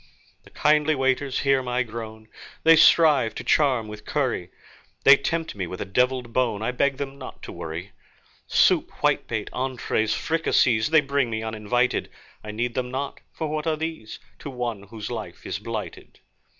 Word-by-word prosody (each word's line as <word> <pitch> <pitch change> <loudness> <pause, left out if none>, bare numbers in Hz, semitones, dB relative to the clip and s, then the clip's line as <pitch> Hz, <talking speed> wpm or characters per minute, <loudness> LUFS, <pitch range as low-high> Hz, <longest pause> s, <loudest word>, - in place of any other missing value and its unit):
The - - -15
kindly 150 +1 +2
waiters 135 0 0
hear 135 -1 +3
my 125 0 -1
groan, 110 -1 -8 0.4
They 165 0 +8
strive 150 -7 +5
to - - -5
charm 130 -7 +2
with 105 0 -9
curry; 130 -12 -1 0.5
They 140 - +9
tempt 165 +4 -2
me 95 -4 -4
with 90 - -7
a - - -3
devilled 125 +3 0
bone 115 -5 0
I 120 - 0
beg 135 +2 +1
them 140 0 -6
not 130 - -10
to - - -7
worry. 85 +5 -6 0.6
Soup, - - +3
whitebait, - - 0
entrées, 125 -4 -1
fricasees, 145 -7 +2
They 160 -1 +5
bring 140 -3 0
me 110 -1 -3
uninvited. 110 +3 0 0.3
I 110 - -8
need 115 +3 -2
them 125 0 -2
not, 135 +2 -4
for 160 - -4
what 155 +1 -3
are 155 -1 +1
these 160 -9 -5 0.2
To - - -7
one 120 -5 -4
whose 110 +1 -7
life 110 -8 -7
is - - -3
blighted? - - -7
125 Hz, 170 wpm, -24 LUFS, 110-140 Hz, 0.6 s, They